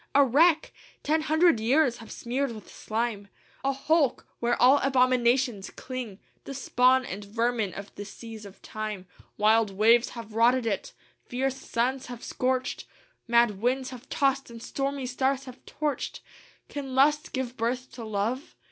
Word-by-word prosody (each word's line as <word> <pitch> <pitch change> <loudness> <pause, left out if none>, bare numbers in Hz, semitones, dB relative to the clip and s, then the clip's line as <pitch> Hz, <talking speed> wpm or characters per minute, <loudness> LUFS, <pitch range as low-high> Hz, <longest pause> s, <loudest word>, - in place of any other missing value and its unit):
A 285 - +8
wreck! 315 +5 +3 0.3
ten 310 +2 +2
hundred 315 -3 +3
years 250 +3 +3
have 225 - -12
smeared 255 +1 -2
with 215 - -12
slime: 220 -2 -3 0.4
A 275 - +2
hulk! 285 +1 +1
where 240 0 0
all 260 +3 +6
abominations 250 -4 +2
cling, 250 -6 -7 0.3
The 275 - -6
spawn 255 0 +3
and 200 0 -6
vermin 225 -1 -1
of 200 0 -8
the 205 - -7
seas 220 +1 -10
of 200 -1 -13
time: 215 -3 -5 0.3
Wild 215 +1 +4
waves 225 +5 +4
have 225 -2 -8
rotted 240 +2 +3
it, - - -2 0.3
fierce 265 +1 -1
suns 255 +1 -1
have 245 -1 -8
scorched, 255 0 -1 0.4
Mad 235 -4 +3
winds 255 +2 0
have 255 -1 -11
tossed 275 -1 +1
and 235 -1 -10
stormy 275 -1 -3
stars 265 +2 0
have 255 0 -12
torched. 300 -2 -3 0.5
"Can 270 -3 -6
lust 295 +3 +3
give 260 -2 -3
birth 250 +3 -2
to 235 - -8
love! 220 +6 -3
250 Hz, 155 wpm, -27 LUFS, 225-270 Hz, 0.5 s, A